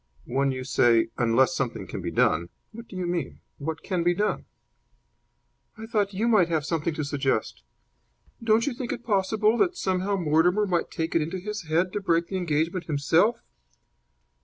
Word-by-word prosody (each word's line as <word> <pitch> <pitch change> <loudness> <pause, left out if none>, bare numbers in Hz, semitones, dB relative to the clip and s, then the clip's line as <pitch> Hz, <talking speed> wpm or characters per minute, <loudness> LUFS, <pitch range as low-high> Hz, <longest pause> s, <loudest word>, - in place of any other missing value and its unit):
"When 135 +2 0
you 130 0 -4
say 115 -3 +3
'unless 120 +7 +3
something 135 -7 -3
can - - -6
be - - -3
done,' 85 +2 +1 0.2
what 230 +1 -10
do - - -11
you 185 -1 -2
mean? 175 -1 -3 0.2
What 160 +2 -4
can 185 -3 -1
be 175 +1 +2
done?" 210 +3 -1 1.3
"I 220 - -7
thought 210 -3 0
you 210 +4 -1
might 205 -7 +4
have 160 -3 0
something 165 0 -1
to 155 - -2
suggest. 135 - -1 0.8
Don't 225 +1 +3
you 285 - -1
think 240 0 -5
it 240 - -5
possible 215 +2 +1
that 360 -2 +2
somehow 190 +1 0
Mortimer 175 +4 +2
might 180 -3 0
take 160 0 -3
it 165 - +3
into 165 +5 -3
his 210 -1 -6
head 170 +4 +1
to 205 - -2
break 170 -3 +1
the 190 - -2
engagement 170 +1 -1
himself?" 160 +9 +2
175 Hz, 180 wpm, -26 LUFS, 150-205 Hz, 1.3 s, might